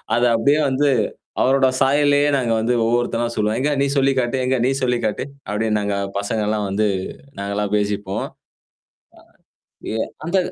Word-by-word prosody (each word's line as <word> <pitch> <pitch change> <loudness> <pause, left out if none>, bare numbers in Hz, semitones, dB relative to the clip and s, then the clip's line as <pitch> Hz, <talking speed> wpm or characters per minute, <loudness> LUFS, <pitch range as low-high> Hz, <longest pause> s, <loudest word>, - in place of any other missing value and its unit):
அத 120 - +1
அப்படியே 140 +7 +3
வந்து 140 +2 +2 0.5
அவரோட 135 +1 +4
சாயல்லயே 145 +1 +3
நாங்க 120 -4 0
வந்து 115 +2 +1
ஒவ்வொருத்தராாம் 120 0 0
சொல்லுவோம். 105 0 0
"எங்க 145 +3 +1
நீ - - +2
சொல்லி 135 0 +3
காட்டு. 120 +1 -1
எங்க 130 +1 +2
நீ - - +2
சொல்லி 125 -1 +1
காட்டு." 110 - -2 0.2
அப்படின்னு 105 +1 0
நாங்க 100 -1 -1 0.2
பசங்கலாம் 105 0 -1
வந்து 105 +2 +1 0.5
நாங்கலாம் 100 +1 -2
பேசிப்போம். 100 -1 -2 1.6
ஆ - - -4
ஏ - - -1 0.3
அந்த 180 +3 +1
120 Hz, 150 wpm, -20 LUFS, 105-135 Hz, 1.6 s, அவரோட